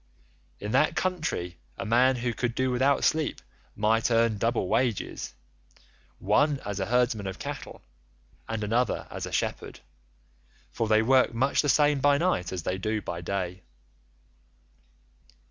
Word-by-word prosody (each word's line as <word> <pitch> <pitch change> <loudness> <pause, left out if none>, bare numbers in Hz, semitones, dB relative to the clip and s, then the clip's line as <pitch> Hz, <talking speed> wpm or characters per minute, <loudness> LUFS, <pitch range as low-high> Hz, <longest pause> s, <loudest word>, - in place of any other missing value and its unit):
In 105 - -5
that 155 - +3
country 155 - -2 0.2
a 115 - -4
man 125 +4 +4
who 120 -1 -2
could 120 +2 -2
do 130 0 +1
without 130 +2 +2
sleep 155 -1 +1 0.4
might 110 +3 +2
earn 115 -2 +2
double 115 -4 0
wages, 120 0 -1 0.8
one 140 +9 +2
as 100 -1 -3
a 95 - -2
herdsman 120 -4 +1
of 95 - -5
cattle, - - -7 0.7
and 110 -1 -2
another 115 +2 0
as - - -5
a - - -8
shepherd, - - -3 0.9
for 115 - -2
they 110 0 +4
work 130 0 +3
much 135 +4 +2
the 145 - -1
same 145 +1 +4
by 145 +1 +4
night 160 - 0
as 90 -3 -4
they 95 +3 -2
do 110 +2 -1
by 85 -4 -5
day. 90 0 -3
115 Hz, 145 wpm, -27 LUFS, 105-130 Hz, 0.9 s, man